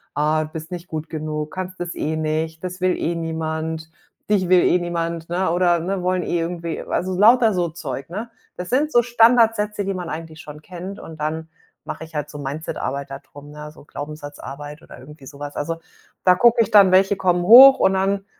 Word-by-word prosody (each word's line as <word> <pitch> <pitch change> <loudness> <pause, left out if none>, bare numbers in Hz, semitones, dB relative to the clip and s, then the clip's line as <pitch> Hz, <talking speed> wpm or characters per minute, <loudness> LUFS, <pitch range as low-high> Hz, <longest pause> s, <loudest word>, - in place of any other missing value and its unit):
„Ah, 155 +1 +1
bist 160 +1 -8
nicht 180 0 -7
gut 155 -1 -6
genug, 155 -1 -4
kannst 185 0 -6
das 175 0 -5
eh 155 +1 -2
nicht, 160 +1 -2
das 180 0 -6
will 185 0 +2
eh 170 - -2
niemand, 160 -1 -4 0.4
dich 190 -4 +1
will 185 -1 +5
eh - - +3
niemand.“ 170 -1 -4
Ne 175 0 0
oder 175 0 +2
ne 185 +2 -3
wollen 180 0 0
eh 175 - -1
irgendwie, 170 -1 -4
also 185 0 -3
lauter 225 +2 +5
so 175 -2 0
Zeug, 160 -3 -7
ne? 215 +6 -6 0.3
Das 180 0 -6
sind 290 +5 +1
so 240 - +5
Standardsätze, 225 -3 +3
die 195 - -2
man 180 -2 -6
eigentlich 160 0 -7
schon 150 -1 -11
kennt 185 +4 -8
und 160 -1 -11
dann 160 +1 -3 0.4
mache - - -6
ich 160 0 -13
halt 150 0 -3
so 150 - -9
Mindsetarbeit 140 -1 -5
da 135 - -7
drum, 145 +1 -15
ne, 150 0 -9
so 150 - -17
Glaubenssatzarbeit 145 0 -8
oder - - -14
irgendwie 145 +1 -14
so 140 +1 -12
was. 145 0 -7
Also, 165 +3 -3 0.5
da 180 -1 +6
gucke 235 -1 +4
ich 215 - 0
dann, 200 -3 +6
welche 195 +2 +4
kommen 180 -2 +1
hoch 260 +7 +9
und 190 - +3
dann 195 +1 0
170 Hz, 205 wpm, -21 LUFS, 155-190 Hz, 0.5 s, hoch